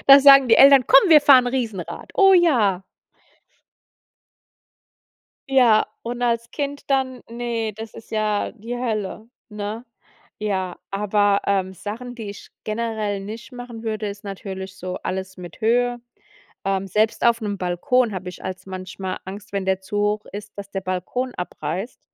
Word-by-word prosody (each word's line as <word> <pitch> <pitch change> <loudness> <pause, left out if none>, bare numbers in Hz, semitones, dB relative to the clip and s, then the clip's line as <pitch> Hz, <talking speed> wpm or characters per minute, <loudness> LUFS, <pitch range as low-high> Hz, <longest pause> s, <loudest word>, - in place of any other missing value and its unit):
Da 275 0 +11
sagen 275 -2 +8
die 225 - +6
Eltern: 275 -2 +7
„Komm, 275 +8 +7
wir 305 -2 +9
fahren 265 -3 +6
Riesenrad”. 230 -8 -4
„Oh 390 -1 +6
ja!” 235 - +3 2.7
Ja, 245 -5 +5 0.2
und 240 +1 -5
als 235 -1 0
Kind 285 -1 -5
dann 260 -2 0
Ne, 230 -2 -3
das 220 +1 -9
ist 225 - -13
ja 215 -1 -1
die 235 +2 -6
Hölle, 220 -2 -3 0.2
ne? 210 +2 -5 0.5
Ja, 190 -4 -2
aber, 205 0 +2
ähm, 190 -1 0
Sachen, 230 +6 -7
die 220 -4 -6
ich 200 - -13
generell 215 -2 -2
nicht 220 +6 -8
machen 245 -2 -9
würde, 215 -1 -3
ist 200 0 -8
natürlich 190 -1 -7
so 185 0 -5
alles 190 0 -4
mit 175 -2 -11
Höhe. 240 +2 +1 0.6
Ähm, 195 0 -1
selbst 215 +4 +1
auf 235 0 +3
'nem 205 -2 -3
Balkon 220 +7 +1
hab 185 0 -5
ich 180 - -8
als 185 0 -6
manchmal 185 0 -6
Angst, 200 +2 -9
wenn 195 -1 -2
der 190 0 0
zu 190 +2 -5
hoch 210 +1 0
ist, 205 0 -7
dass 200 0 -8
der 195 - -3
Balkon 190 +8 -3
abreißt. 180 +4 -5
215 Hz, 155 wpm, -22 LUFS, 195-245 Hz, 2.7 s, Da